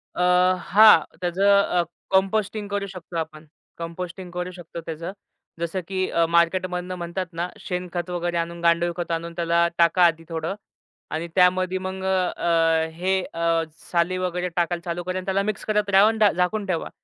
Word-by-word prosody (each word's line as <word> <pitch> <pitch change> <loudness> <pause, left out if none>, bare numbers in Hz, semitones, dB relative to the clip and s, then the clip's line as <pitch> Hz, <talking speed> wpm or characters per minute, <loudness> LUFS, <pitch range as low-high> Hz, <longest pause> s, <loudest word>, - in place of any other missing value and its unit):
अ, - - -2 0.4
हां, 210 -1 +7 0.2
त्याच 175 0 -2
अ, 200 -3 +4 0.3
कंपोस्टिंग 200 +2 +1
करू 200 0 -2
शकतो 180 -2 -8
आपण. 160 -1 -5 0.3
कंपोस्टिंग 175 +2 -6
करू 180 +1 -4
शकतो 170 -2 -9
त्याचं. 165 +2 -5 0.5
जसं 170 +3 -2
की 185 -1 -1
अ, 170 0 +2
मार्केटमधनं 180 +2 +1
म्हणतात 175 +1 -4
ना, 170 +2 -2
शेणखत 180 -1 -4
वगैरे 175 -1 -2
आणून, 170 0 -3
गांडूळखत 170 0 +1
आणून 170 0 -3
त्याला 170 0 +2
टाका 170 +1 +4
आधी 165 -1 +1
थोडं 165 +3 -3 0.6
आणि 160 +2 -3
त्यामध्ये 185 0 +3
मग 190 0 -5
अ, 185 -1 +1
अ, 165 -1 +2
हे 190 +3 0
अ, 165 0 +1 0.3
साली 175 +1 +1
वगैरे 180 0 -2
टाकायला 175 0 0
चालू 175 0 -3
करा 185 +1 -3
आणि 185 - -5
त्याला 195 +1 +1
मिक्स 210 0 -3
करत 210 -1 0
राहा 195 +1 +6
अन् 220 0 +1
डा 210 -2 +5
झाकून 185 +4 0
ठेवा. 180 -4 -2
180 Hz, 170 wpm, -24 LUFS, 170-190 Hz, 0.6 s, हां